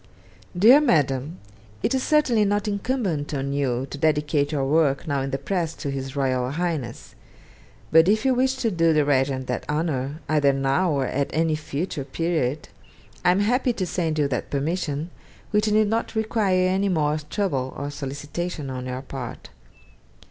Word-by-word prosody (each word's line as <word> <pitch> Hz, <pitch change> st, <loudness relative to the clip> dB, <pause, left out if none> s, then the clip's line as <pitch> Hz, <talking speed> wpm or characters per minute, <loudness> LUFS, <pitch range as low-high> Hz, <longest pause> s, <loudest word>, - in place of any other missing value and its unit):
'DEAR 240 Hz, +10 st, +7 dB
MADAM, 145 Hz, -, +1 dB, 0.5 s
It -, -, +1 dB
is 260 Hz, -, +1 dB
certainly 260 Hz, -7 st, +3 dB
not 205 Hz, +1 st, 0 dB
incumbent 200 Hz, -, -1 dB
on 140 Hz, 0 st, -2 dB
you 130 Hz, -3 st, 0 dB
to 145 Hz, -, -6 dB
dedicate 150 Hz, -1 st, +1 dB
your 140 Hz, -3 st, 0 dB
work 145 Hz, 0 st, +2 dB
now 140 Hz, -2 st, 0 dB
in 135 Hz, -, -2 dB
the 135 Hz, -, -1 dB
press 170 Hz, -1 st, -2 dB
to 140 Hz, -, -4 dB
His 135 Hz, 0 st, -5 dB
Royal 130 Hz, -2 st, 0 dB
Highness; 160 Hz, -4 st, -3 dB, 0.8 s
but 160 Hz, +3 st, +6 dB
if 215 Hz, +4 st, +2 dB
you 265 Hz, -, +4 dB
wish 260 Hz, +1 st, +2 dB
to 250 Hz, -4 st, -1 dB
do 165 Hz, -2 st, +3 dB
the 150 Hz, -1 st, +3 dB
Regent 135 Hz, -2 st, +1 dB
that 125 Hz, -1 st, -3 dB
honour 150 Hz, -2 st, -1 dB
either 145 Hz, -2 st, +3 dB
now 135 Hz, +6 st, +1 dB
or 140 Hz, -2 st, 0 dB
at 140 Hz, +2 st, -1 dB
any 160 Hz, 0 st, +1 dB
future 155 Hz, 0 st, -4 dB
period 150 Hz, -1 st, -1 dB, 0.6 s
I -, -, +4 dB
am 185 Hz, +3 st, +3 dB
happy 245 Hz, +4 st, +2 dB
to 195 Hz, -5 st, -2 dB
send 165 Hz, -3 st, -1 dB
you 145 Hz, -2 st, +2 dB
that 125 Hz, -, -3 dB
permission, 150 Hz, +2 st, -2 dB, 0.4 s
which 210 Hz, 0 st, +2 dB
need 215 Hz, 0 st, +4 dB
not 225 Hz, +2 st, -1 dB
require 210 Hz, -4 st, +1 dB
any 190 Hz, +2 st, +1 dB
more 155 Hz, -3 st, +1 dB
trouble 140 Hz, -11 st, -1 dB
or 145 Hz, +1 st, -4 dB
solicitation 145 Hz, +2 st, -5 dB
on 130 Hz, 0 st, -5 dB
your 130 Hz, +1 st, -4 dB
part. 130 Hz, -3 st, -8 dB
155 Hz, 170 wpm, -24 LUFS, 140-190 Hz, 0.8 s, DEAR